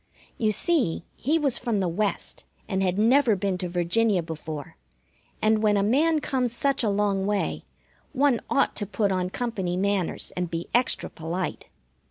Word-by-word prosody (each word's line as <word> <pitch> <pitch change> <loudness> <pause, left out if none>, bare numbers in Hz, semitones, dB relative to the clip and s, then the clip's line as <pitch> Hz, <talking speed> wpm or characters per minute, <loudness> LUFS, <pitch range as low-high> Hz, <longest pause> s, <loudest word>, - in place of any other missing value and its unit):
You 215 -2 +2
see, 250 - +1
he 300 +7 +1
was 280 -6 +2
from 235 -4 -1
the 190 - +1
West, 200 +4 -2 0.2
and 190 -1 -1
had 185 -1 +1
never 235 +1 +4
been 195 -1 -1
to 180 -1 -3
Virginia 180 +3 +1
before; 160 -1 -7 0.7
and 215 0 +3
when 210 -1 +3
a 200 - +2
man 300 +8 +3
comes 250 -4 -1
such 275 +3 +1
a 220 - +2
long 200 -1 +1
way, 205 -1 -1 0.5
one 275 -4 +2
ought 280 - +2
to 205 - -1
put 205 0 0
on 180 -1 0
company 190 -6 -2
manners 200 -2 -1
and 180 -1 -2
be 165 0 -4
extra 245 +2 +2
polite. 170 +3 -4
205 Hz, 170 wpm, -26 LUFS, 180-240 Hz, 0.7 s, never